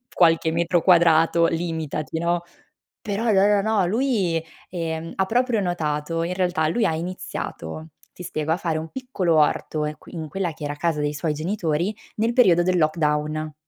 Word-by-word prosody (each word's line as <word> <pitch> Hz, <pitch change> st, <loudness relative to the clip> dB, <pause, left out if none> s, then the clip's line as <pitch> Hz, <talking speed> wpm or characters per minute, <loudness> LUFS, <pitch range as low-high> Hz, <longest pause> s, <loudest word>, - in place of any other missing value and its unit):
qualche 165 Hz, -1 st, +3 dB
metro 170 Hz, +1 st, +1 dB
quadrato, 165 Hz, -1 st, +5 dB
limitati, 160 Hz, -2 st, -3 dB
no?" 170 Hz, +1 st, 0 dB, 0.6 s
Però 210 Hz, +2 st, -3 dB
no, 195 Hz, 0 st, +5 dB
no, 205 Hz, -1 st, +4 dB
no 215 Hz, -3 st, +2 dB
lui, 200 Hz, -7 st, 0 dB, 0.3 s
ehm, 165 Hz, -2 st, -4 dB
ha 190 Hz, -, +2 dB
proprio 240 Hz, +1 st, +1 dB
notato 165 Hz, -2 st, -2 dB
in 180 Hz, -, -2 dB
realtà 180 Hz, -4 st, +1 dB
lui 220 Hz, +8 st, +1 dB
ha 160 Hz, -, +1 dB
iniziato, 160 Hz, -, -6 dB, 0.2 s
ti 180 Hz, -, -10 dB
spiego, 155 Hz, -1 st, -2 dB
a -, -, +2 dB
fare 165 Hz, -4 st, -1 dB
un 160 Hz, 0 st, -6 dB
piccolo 200 Hz, -11 st, -1 dB
orto 150 Hz, 0 st, +1 dB
in 150 Hz, 0 st, -4 dB
qui -, -, -15 dB
in 160 Hz, -2 st, -5 dB
quella 180 Hz, +1 st, -2 dB
che 150 Hz, -, -9 dB
era 145 Hz, 0 st, -3 dB
casa 160 Hz, 0 st, -1 dB
dei 145 Hz, 0 st, -1 dB
suoi 150 Hz, +2 st, -1 dB
genitori 170 Hz, +3 st, -1 dB, 0.2 s
nel 225 Hz, +2 st, +1 dB
periodo 185 Hz, -9 st, +5 dB
del 180 Hz, +1 st, +1 dB
lockdown. 155 Hz, -1 st, 0 dB
170 Hz, 175 wpm, -23 LUFS, 155-185 Hz, 0.6 s, quadrato